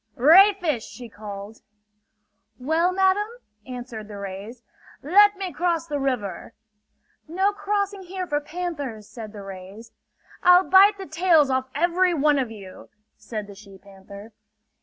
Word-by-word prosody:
"Ray 365 +11 +7
fish!" 315 - -2
she 245 -1 -11
called. 205 0 -9 1.0
"Well, 320 +7 +1
madam?" 385 +2 +2 0.4
answered 245 -4 -8
the 205 -1 -9
rays. 200 +5 -8 0.4
"Let 405 +7 +5
me 380 -2 -5
cross 340 -2 -1
the 295 -3 -3
river!" 250 -6 -3 0.7
"No 380 +5 +1
crossing 405 -1 -2
here 370 0 -6
for 295 -3 -2
panthers!" 290 - -6
said 220 -3 -9
the 205 -2 -10
rays. 195 +4 -11 0.5
"I'll 360 +1 +5
bite 395 +2 +6
the 385 - -7
tails 320 -3 +3
off 260 0 -1
every 350 +3 +2
one 295 -1 +2
of 255 -4 -2
you!" 200 -4 -12 0.3
said 215 0 -7
the 200 - -12
she 195 -1 -15
panther. 200 +2 -14
285 Hz, 140 wpm, -23 LUFS, 215-360 Hz, 1.0 s, Ray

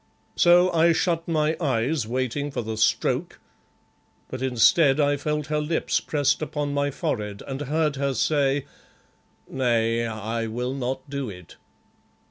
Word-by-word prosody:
So 175 +1 +5
I 165 +1 +4
shut 165 0 0
my 155 -1 +1
eyes 130 -2 0
waiting 130 +4 -2
for 135 - -4
the 110 0 -4
stroke, 110 0 0 0.9
but 130 - -6
instead 135 +3 +4
I 145 -1 +3
felt 150 +1 -2
her 150 0 -1
lips 160 +2 0
pressed 145 -1 0
upon 145 -2 -3
my 145 0 0
forehead, 105 -6 -4
and 135 0 -5
heard 150 0 0
her 140 -1 -1
say 140 +1 +1 0.8
"'Nay, 115 -3 0
I 110 +1 -3
will 125 +3 -3
not 130 +1 -4
do 140 -3 -4
it. 90 -5 -12
140 Hz, 140 wpm, -24 LUFS, 120-150 Hz, 0.9 s, So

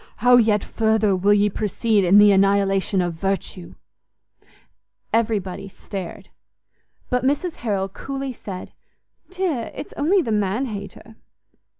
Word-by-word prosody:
How 245 +2 +5
yet 215 -3 +3
further 220 -3 +1
will 200 +3 +3
ye 205 0 +3
proceed 210 +1 0
in 185 +3 +5
the 205 0 +7
annihilation 195 -1 +2
of 175 -1 -2
virtue!" 190 0 -4 1.4
Everybody 200 -4 -1
stared; 195 0 -8 0.8
but 250 0 +1
Mrs 290 +6 -1
Harrel 200 -5 -2
coolly 270 +6 -6
said, 190 -5 -8 0.6
"Dear, 360 -11 -2
it's - - -8
only 350 +6 +2
the 230 - -3
man 210 +4 0
hater!" 215 0 -9
210 Hz, 120 wpm, -22 LUFS, 195-240 Hz, 1.4 s, the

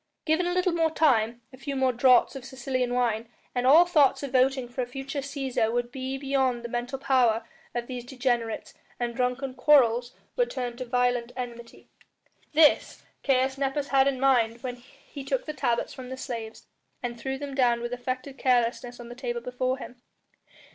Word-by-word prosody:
Given 325 +3 +2
a 355 - 0
little 365 0 +2
more 330 -1 +2
time, 240 -7 +2
a - - -11
few 280 0 -4
more 260 -1 +2
draughts 250 +2 +4
of 270 - -7
Sicilian 255 -1 -2
wine, 230 -2 0 0.2
and 250 0 0
all 320 +6 +8
thoughts 295 -6 +3
of 280 - -4
voting 260 0 +2
for 245 +2 -4
a 245 - -2
future 270 +3 -5
Cæsar 270 -5 -1
would 240 0 -1
be 265 +1 -4
beyond 265 -3 0
the 235 - -5
mental 245 +3 -3
power 245 -4 +2 0.3
of 240 0 -2
these 250 -1 -6
degenerates, 245 -3 -2 0.3
and 240 -1 -2
drunken 255 +2 -1
quarrels 250 -3 +4 0.2
would - - +1
turn 245 -2 -4
to 255 - -5
violent 245 -1 0
enmity. 235 -2 -8 0.6
This 310 -1 +4 0.2
Caius 265 0 +1
Nepos 280 +1 -1
had 270 0 +4
in 270 -2 0
mind 240 -4 +2
when 250 -1 -4
he 275 +2 -12
took - - -2
the 305 - -4
tablets 250 -4 -1
from 255 -2 -9
the 260 - -6
slaves, 230 -3 -6 0.4
and 240 -1 -3
threw 265 +2 -3
them 285 0 -6
down 245 -3 +3
with 240 +1 -4
affected 255 +2 -5
carelessness 245 -1 +1
on 240 - -9
the 240 - -8
table 240 -1 -4
before 255 +2 -2
him. 250 -2 -10
255 Hz, 185 wpm, -27 LUFS, 240-270 Hz, 0.6 s, all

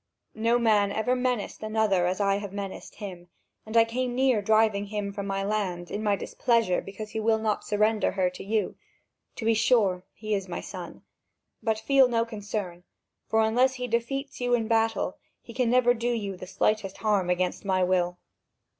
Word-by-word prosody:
No 230 +2 +2
man 210 -4 +3
ever 235 +5 +1
menaced 250 -4 -2
another 215 -4 +1
as 185 +2 -1
I 200 -1 +2
have 205 -1 -6
menaced 200 -1 -6
him, 180 -4 -8 0.4
and 220 +1 0
I 230 - +7
came 245 +1 -2
near 255 -4 +3
driving 215 -1 +2
him 205 -1 -3
from 200 -1 -4
my 195 0 -1
land, 195 -4 -2
in 210 - -3
my 205 -2 +2
displeasure 230 -3 +1
because 210 +2 -8
he 220 - -3
will 220 0 +2
not 220 -1 -1
surrender 215 +1 +1
her 190 -2 +2
to - - -9
you. 210 0 0 0.6
To 225 - -6
be 225 - +4
sure, 210 -5 +2
he 215 0 -3
is 195 -2 -1
my 175 - -3
son; - - -8 0.6
but 220 -2 0
feel 265 +4 +4
no 230 -1 +1
concern, 205 -5 -5 0.4
for 220 0 +3
unless 250 +4 +3
he 250 -1 -4
defeats 250 +4 -2
you 245 0 +3
in 225 -2 -1
battle, 225 -4 +1 0.3
he 235 - -11
can 250 -1 +1
never 245 0 +4
do 240 0 -2
you 205 -5 -2
the 185 - -9
slightest 200 0 0
harm 205 -4 +1
against 180 0 0
my 190 -2 +1
will." 180 -1 +1
215 Hz, 190 wpm, -27 LUFS, 195-230 Hz, 0.6 s, I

